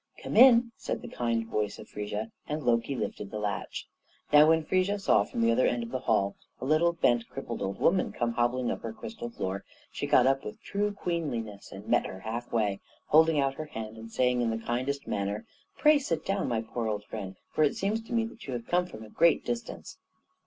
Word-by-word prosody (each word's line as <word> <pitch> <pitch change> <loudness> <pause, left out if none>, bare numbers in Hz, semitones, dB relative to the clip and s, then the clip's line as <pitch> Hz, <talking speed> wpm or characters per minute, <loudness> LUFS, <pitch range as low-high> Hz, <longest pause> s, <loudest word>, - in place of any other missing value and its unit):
"Come - - -4
in!" 235 -1 +7
said - - -4
the - - -6
kind 115 -1 -1
voice 105 -2 -2
of - - -11
Frigga, 105 +2 -4 0.2
and 150 0 -3
Loki 120 +2 +1
lifted 105 -4 -4
the 105 - -5
latch. 105 -1 -3 0.5
Now 150 +1 +8
when 160 0 +4
Frigga 185 +5 +1
saw, 195 - +3
from 115 - -4
the 115 0 +4
other 125 +2 +3
end 120 -1 0
of 115 - -7
the 130 - -1
hall, 100 -5 +1 0.2
a 125 - -5
little, 155 +4 +3
bent, 120 -8 +2
crippled 120 -4 -6
old 95 0 -3
woman 185 +1 +3
come 120 -1 -1
hobbling 120 +1 +1
up - - -4
her 115 -1 -5
crystal 230 - -7
floor, 95 - -4 0.3
she - - -3
got 125 - +5
up 135 +1 +2
with 105 - -7
true 205 +1 -1
queenliness 145 - -4
and - - -10
met - - +2
her 95 - -8
halfway, 110 -3 -1 0.3
holding 160 0 +5
out 135 -1 +2
her 155 +3 -6
hand 110 -6 -7
and 115 0 -10
saying 125 0 +2
in 120 - +1
the 115 - -1
kindest 130 +4 -1
manner, 100 +1 -2 0.3
"Pray 300 -1 +6
sit 170 - -2
down, 195 0 0
my 115 -2 0
poor 115 0 -3
old 105 -1 -2
friend; 100 -3 -6 0.2
for 155 - +2
it 150 - +2
seems 210 +3 -1
to 225 - -14
me 230 -1 +2
that 225 -5 -10
you 130 - -3
have 120 -1 -4
come 180 0 +1
from 110 -11 -10
a 110 - -11
great 170 0 +3
distance." 120 -1 -5
120 Hz, 225 wpm, -29 LUFS, 110-165 Hz, 0.5 s, Now